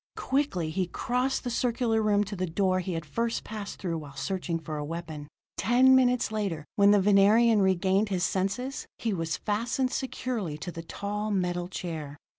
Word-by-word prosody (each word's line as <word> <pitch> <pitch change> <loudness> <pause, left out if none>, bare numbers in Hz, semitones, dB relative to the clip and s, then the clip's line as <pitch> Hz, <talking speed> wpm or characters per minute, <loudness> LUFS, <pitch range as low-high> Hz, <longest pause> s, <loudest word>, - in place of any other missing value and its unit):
Quickly 260 - 0
he 185 +2 -1
crossed 250 +7 -1
the 245 - -3
circular 235 -2 +1
room 205 -1 +3
to 205 0 -6
the 185 -1 -2
door 185 +2 +1
he 185 0 -3
had 165 -2 -4
first 230 +9 -2
passed 210 -2 -6
through 170 -3 -3
while 145 -3 -11
searching 175 +3 -2
for 155 -1 -6
a 150 - -3
weapon. 160 -1 -6 0.3
Ten 255 +5 +5
minutes 250 -3 +3
later, 195 -8 -2
when 200 -2 +5
the 205 0 +6
Venerian 205 +3 +5
regained 190 +2 +2
his 185 -3 -1
senses, 200 +9 -1
he 225 -3 -1
was 165 -3 -2
fastened 235 +5 -1
securely 235 - -3
to 175 +4 -6
the 165 - -7
tall, 205 +5 -4
metal 180 -3 -1
chair. 160 -6 -6
195 Hz, 180 wpm, -28 LUFS, 170-230 Hz, 0.3 s, the